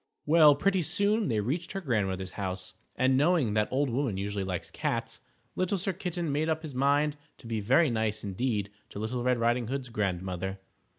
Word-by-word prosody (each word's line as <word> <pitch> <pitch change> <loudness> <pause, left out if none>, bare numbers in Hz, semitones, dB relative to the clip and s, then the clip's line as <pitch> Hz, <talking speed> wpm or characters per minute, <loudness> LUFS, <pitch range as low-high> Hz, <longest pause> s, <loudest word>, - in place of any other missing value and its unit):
Well, 155 -2 +7
pretty 190 +5 +2
soon 200 +6 +1
they 110 -3 +1
reached 150 - -2
her 195 - -2
Grandmother's 95 - -1
house, 95 -1 -4 0.2
and, 130 0 +3
knowing 145 -5 +3
that 105 0 +2
old 140 +2 +1
women 120 -5 -1
usually 100 0 -2
like 95 -2 -4
cats, - - -2 0.3
Little 185 +2 0
Sir 190 +1 -1
Kitten 175 -3 -3
made 155 +3 0
up 160 0 -1
his 155 -3 -6
mind 145 +3 +2 0.2
to - - -17
be 115 -1 -2
very 130 +8 +3
nice 110 -2 -1
indeed 105 0 -1 0.2
to - - -10
Little 110 +4 -2
Red 125 0 +2
Riding 120 0 +1
Hood's 130 0 -3
Grandmother. 95 -2 -2
125 Hz, 185 wpm, -29 LUFS, 105-155 Hz, 0.3 s, Well